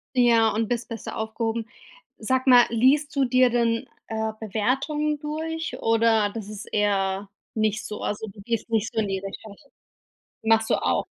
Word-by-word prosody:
Ja, 235 -3 +5
und 220 0 0
bist 240 -1 -2
besser 230 -1 -6
aufgehoben. 225 +1 -2 0.5
Sag 260 +4 0
mal, 245 -2 +7
liest 275 +6 +2
du 275 - +3
dir 255 0 +4
denn, 230 -1 0 0.2
äh, 220 -1 -2
Bewertungen 270 +8 -1
durch, 320 +2 -4
oder 225 -2 +3
das 210 -2 -7
ist 210 +1 -7
eher 195 -1 0 0.2
nicht 215 -1 0
so? 210 - -6
Also, 215 +1 -3
du 200 0 -12
gehst 230 +2 -3
nicht 225 -1 0
so 225 - 0
in 210 - 0
die 195 -1 -2
Richtung? 200 +1 -8 0.9
Machst 225 0 +3
du - - +5
auch. - - +1
225 Hz, 165 wpm, -25 LUFS, 215-250 Hz, 0.9 s, mal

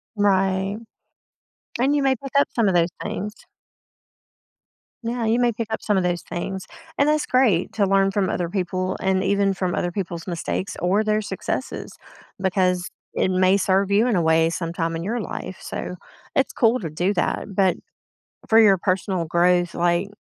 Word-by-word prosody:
Right. 195 0 +1 1.0
And 275 +4 +3
you 285 - +1
may 265 -1 +3
pick 275 +2 -9
up - - +3
some 230 -4 +3
of 185 - +2
those 170 0 +3
things. 210 +2 -4 1.7
Yeah, 235 0 -2
you 225 +2 +2
may 240 -1 +3
pick 225 0 -4
up - - -2
some 210 - +1
of 185 - +1
those 175 -1 0
things. 190 +2 -5 0.3
And 285 - +3
that's 300 0 +2
great 235 -9 +2
to 205 - +2
learn 195 0 +3
from 195 -2 0
other 175 -2 -2
people 185 0 -2
and 190 0 +1
even 200 0 +2
from 185 -2 -2
other 175 - -1
people's 175 -2 -5
mistakes 180 +2 -3
or 195 +5 +2
their 215 0 +1
successes, 205 +6 -4 0.5
because 185 -2 +1 0.2
it 185 - +1
may 185 +1 +4
serve 195 0 +1
you 210 +4 +4
in 235 - +2
a - - +2
way 160 0 +3
sometime 165 -1 -2
in 165 - -4
your 230 +6 -2
life, 185 -3 -6
so 180 - -5 0.4
it's 270 - +1
cool 235 +1 +3
to 165 -6 -5
do 175 +6 0
that. 175 - -1
But 190 -2 +3 0.7
for 225 0 +6
your 200 -4 +6
personal 185 -1 -1
growth, 175 +1 +2
like 175 +3 +1
190 Hz, 180 wpm, -23 LUFS, 180-210 Hz, 1.7 s, for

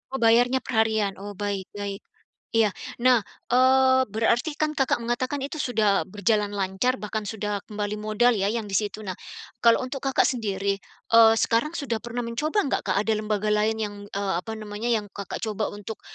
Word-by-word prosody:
Oh - - -2
bayarnya 245 +3 +4
perharian. 220 -4 +1
Oh 205 +1 -7
baik 200 -1 -3
baik. 200 -1 -4 0.5
Iya. 225 -2 +3 0.3
Nah, 250 -2 +5 0.3
eee, 260 +1 +5
berarti 230 +7 +1
kan 305 0 +1
Kakak 270 -4 +1
mengatakan 250 +4 -1
itu 285 +3 -5
sudah 215 -5 +2
berjalan 205 +1 +1
lancar, 195 +6 0
bahkan 215 +1 -3
sudah 210 -1 -3
kembali 210 -1 -3
modal 215 +3 +3
ya 200 -2 0
yang 225 +1 -1
di - - -8
situ. 210 +1 -1
Nah, 190 - -3 0.5
kalau 230 +1 +5
untuk 265 +2 -5
Kakak 270 0 +2
sendiri, 200 -4 -1 0.3
eee, 225 -1 +8
sekarang 235 +8 +1
sudah 235 -6 -2
pernah 240 +2 -4
mencoba 300 - 0
enggak, 275 - -1
Kak, - - +1
ada 220 - 0
lembaga 215 -1 -1
lain 215 +1 +2
yang, 205 -1 -3
eee, 200 -1 -2
apa 220 +4 -6
namanya, 215 +1 -5
yang 225 -3 +1
Kakak 200 0 -6
coba 215 -1 -2
untuk 205 +1 -8
220 Hz, 180 wpm, -25 LUFS, 205-245 Hz, 0.5 s, eee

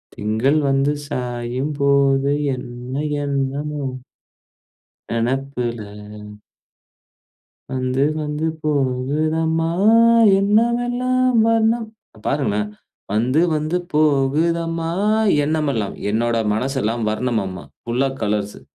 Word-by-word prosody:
திங்கள் 115 +8 +1
வந்து 135 +1 +2 0.2
சாயும் 125 +1 -3
போது 140 0 +3 0.2
என்ன 125 0 -8 0.3
என்னமோ 140 +1 -2 1.3
நெனப்புல 120 -1 -2 1.9
வந்து, 130 +1 -1 0.2
வந்து 150 +1 -2 0.2
போகுதம்மா 155 +4 0 0.7
எண்ணமெல்லாம் 245 +4 +2
வர்ணம் 225 0 +2 0.3
அ, - - -15
பாருங்களேன் 105 -7 0 0.4
வந்து, 125 +8 +2
வந்து 155 +3 -1 0.2
போகுதம்மா 165 +3 +1 0.5
எண்ணமெல்லாம் 145 -9 -1 0.2
என்னோட 115 +2 0 0.2
மனசெல்லாம் 120 -1 -1
வர்ணம்மா. 110 -5 -2 0.2
ஃபுல்லா 125 +3 0
கலர்ஸ்சு. 105 -1 -2
135 Hz, 75 wpm, -20 LUFS, 120-155 Hz, 1.9 s, போது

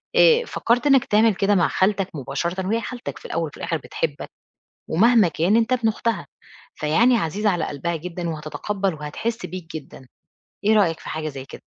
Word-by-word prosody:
اآ 485 0 +6
فكّرت 245 - 0
إنّك 270 -3 +5
تعمل 215 0 +3
كده 200 +2 +2
مع 175 -4 +3
خالتك 195 +5 +1
مباشرةً 170 +7 -3
وهي 225 +3 0
خالتك 245 +1 -6
في - - -15
الأول - - -2
وفي - - -12
الآخِر - - -2
بتحبك - - -4 0.6
ومهما 220 +3 +5
كان 170 +6 +2
أنت 230 +2 +2
ابن 240 -3 +2
أختها، 230 +1 -1 0.5
فيعني 225 +12 +3
عزيز 200 +2 -2
على 180 -5 +2
قلبها 165 +4 -3
جدًا 175 +1 -5
وهتتقبّل 185 +5 -3
وهتحِس 190 +11 -4
بيك 180 -3 -7
جدًا، 135 -3 -11 0.6
إيه 215 +2 +4
رأيك 180 -7 +2
في - - -10
حاجة 155 0 -3
زي 135 -3 -7
كده؟ - - -11
195 Hz, 180 wpm, -23 LUFS, 160-230 Hz, 0.6 s, اآ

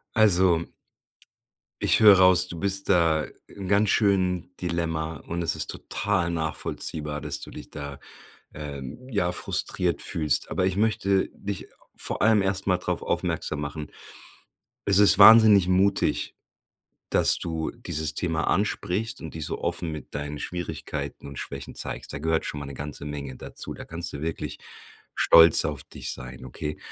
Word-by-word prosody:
Also 95 -6 +4 1.1
ich - - +4
höre 105 -3 +8
raus, 90 -1 +5
du 85 -2 -7
bist 100 0 -2
da 80 -4 +2 0.2
im 95 -2 -9
ganz 100 +1 +2
schönen 90 -4 +1
Dilemma 80 -3 -3
und 85 +1 -3
es - - 0
ist - - -2
total 95 -4 -2
nachvollziehbar, 80 -2 -3
dass - - -2
du - - -10
dich - - -10
da, 70 -1 -8 0.5
ähm, 75 - -8
ja, 90 -5 0
frustriert - - -1
fühlst. 75 -5 0
Aber, 95 - 0
ich 95 0 -1
möchte 100 -3 +1
dich 100 -1 -6 0.3
vor - - +2
allem 110 -1 +4
erst 95 0 -1
mal 90 -1 +3
drauf 90 - -3
aufmerksam 75 - -2
machen, 75 +1 -6 1.0
es 100 -1 +4
ist 105 -1 +7
wahnsinnig 105 -3 +8
mutig, 95 +2 +1 0.7
dass - - +5
du 80 -1 -3
dieses 80 0 -1
Thema 80 -2 -1
ansprichst 105 +2 -1
und 80 - -8
dich 80 -2 -3
so - - -4
offen 80 -2 -2
mit 75 - -9
deinen 75 0 -5
Schwierigkeiten 75 -5 -6
und 70 -1 -8
Schwächen - - -7
zeigst. - - -6
Da 70 - -5
gehört 80 +1 -1
schon 75 - -5
mal 70 - -7
‘ne 70 - -8
ganze 75 +1 -7
Menge 70 -3 -6
dazu. - - -8
Da - - -9
kannst 85 +1 -6
du 70 - -7
wirklich 80 +1 -5 0.6
stolz 80 0 +6
auf - - -4
dich - - -6
sein, 65 0 -10
okay? 75 +4 -6
85 Hz, 160 wpm, -25 LUFS, 75-95 Hz, 1.1 s, höre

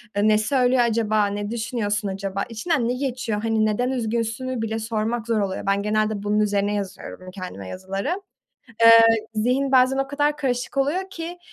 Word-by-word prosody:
eee, 205 +1 +2
ne 215 0 +5
söylüyor 250 +2 +2
acaba, 220 -2 +2
ne 205 +1 -4
düşünüyorsun 220 -3 -2
acaba, 195 0 -3
içinden 235 +2 -1
ne - - +1
geçiyor, 250 -5 -2
hani 220 -1 +2
neden 245 +4 0
üzgünsünü 235 +1 -2
bile 225 0 -2
sormak 225 +1 -2
zor 225 -2 +1
oluyor. 195 -2 -2
Ben 200 0 +1
genelde 215 +1 +1 0.2
bunun 210 +1 +1
üzerine 205 -1 +1
yazıyorum, 185 -2 -6
kendime 180 - -8
yazıları. 195 - -4 0.6
Eee, 230 - +10 0.4
zihin 255 +5 +1
bazen 260 +1 +4
o 270 - -1
kadar 290 +1 0
karışık 250 -1 -2
oluyor 350 +8 0
ki, 345 0 -7
225 Hz, 165 wpm, -23 LUFS, 205-255 Hz, 0.6 s, Eee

